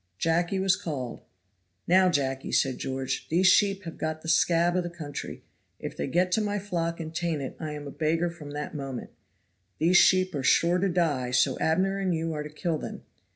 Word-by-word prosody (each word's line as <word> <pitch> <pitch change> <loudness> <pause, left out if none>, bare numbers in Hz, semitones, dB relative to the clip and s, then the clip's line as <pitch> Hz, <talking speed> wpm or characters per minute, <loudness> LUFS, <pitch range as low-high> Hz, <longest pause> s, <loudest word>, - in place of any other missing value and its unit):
Jacky 170 - +1
was 190 -1 +3
called. 145 -11 -5 0.7
"Now, 185 +1 +5
Jacky," 135 -4 -1
said 130 -3 +1
George, 130 0 -3
"these 175 +4 +2
sheep 195 +1 +4
have 165 -2 -8
got 155 0 -3
the - - -8
scab 170 +1 +3
of 180 - +2
the 175 - -4
country; 155 -4 -7 0.3
if - - -6
they - - -3
get 180 +6 +1
to 215 - +2
my 205 -1 -1
flock 170 -4 -2
and 160 -1 -6
taint 170 -2 -1
it 130 - -6
I 155 -2 -4
am 145 -1 -7
a 140 - -6
beggar 165 +3 0
from 160 -4 -10
that 145 +1 -5
moment. 135 -4 -6 0.7
These 175 +3 +4
sheep 185 0 +4
are 140 - -2
sure 170 +6 +3
to 195 +1 +1
die, 155 -8 0
so 130 +1 +2
Abner 190 +5 +1
and 185 -3 0
you 165 0 -2
are 150 - -3
to 150 - -6
kill 155 +1 -2
them. - - -7
165 Hz, 205 wpm, -27 LUFS, 150-180 Hz, 0.7 s, Now